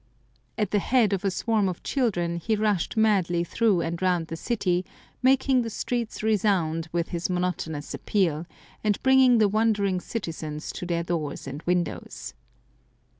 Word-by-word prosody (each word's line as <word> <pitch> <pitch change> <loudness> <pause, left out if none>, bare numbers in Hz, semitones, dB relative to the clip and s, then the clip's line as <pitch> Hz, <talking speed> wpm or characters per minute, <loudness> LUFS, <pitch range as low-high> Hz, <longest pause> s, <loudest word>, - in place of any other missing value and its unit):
At 210 -4 -1
the 210 - +3
head 225 -1 +2
of 195 0 -1
a 200 - +2
swarm 210 +1 +1
of 180 - -6
children 175 -11 0
he 215 +6 0
rushed 210 -2 0
madly 190 -6 +3
through 200 0 +2
and 170 +1 -3
round 180 -3 +1
the 165 - -4
city, 185 -2 0 0.4
making 260 0 +4
the 230 - -3
streets 235 0 -3
resound 180 -7 +1
with 170 -1 -1
his 170 +1 -2
monotonous 180 -4 -2
appeal, 170 -5 0 0.4
and 210 -2 +2
bringing 265 -2 +6
the 215 -2 +5
wondering 205 -3 +1
citizens 160 -7 -5
to 180 - -6
their 170 -1 0
doors 160 -4 -3
and 140 +2 -6
windows. 175 - -2
185 Hz, 155 wpm, -26 LUFS, 170-220 Hz, 0.4 s, bringing